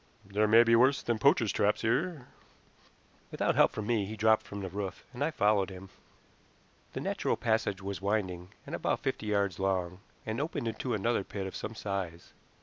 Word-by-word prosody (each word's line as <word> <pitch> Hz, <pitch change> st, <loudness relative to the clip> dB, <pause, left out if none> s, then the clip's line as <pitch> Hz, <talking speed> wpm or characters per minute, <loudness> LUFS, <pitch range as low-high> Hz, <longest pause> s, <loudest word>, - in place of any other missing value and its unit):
"There 105 Hz, +2 st, +1 dB
may 115 Hz, +2 st, +7 dB
be 115 Hz, 0 st, +4 dB
worse 130 Hz, +4 st, +4 dB
than 120 Hz, -2 st, -1 dB
poachers' 105 Hz, +1 st, +4 dB
traps 105 Hz, +1 st, +1 dB
here." 150 Hz, +5 st, 0 dB, 1.0 s
Without -, -, 0 dB
help -, -, +5 dB
from 105 Hz, -, -5 dB
me 110 Hz, -3 st, +1 dB
he 110 Hz, -, -6 dB
dropped 110 Hz, 0 st, +3 dB
from 100 Hz, 0 st, -6 dB
the 95 Hz, -, -4 dB
roof, 100 Hz, 0 st, -5 dB
and 125 Hz, -, -2 dB
I 155 Hz, -, +2 dB
followed 105 Hz, -9 st, +2 dB
him. 95 Hz, 0 st, -10 dB, 1.0 s
The -, -, -3 dB
natural -, -, -1 dB
passage 110 Hz, -4 st, 0 dB
was 100 Hz, -2 st, -4 dB
winding, 95 Hz, -3 st, -1 dB, 0.2 s
and -, -, -8 dB
about -, -, -1 dB
fifty 110 Hz, -, -2 dB
yards 100 Hz, -3 st, 0 dB
long, 90 Hz, -2 st, -1 dB, 0.3 s
and 110 Hz, +4 st, -2 dB
opened 145 Hz, -5 st, -3 dB
into 115 Hz, +2 st, -2 dB
another 110 Hz, 0 st, 0 dB
pit 95 Hz, 0 st, -5 dB
of 95 Hz, -, -6 dB
some 110 Hz, -, -5 dB
size. 95 Hz, -5 st, -5 dB
105 Hz, 185 wpm, -30 LUFS, 95-115 Hz, 1.0 s, may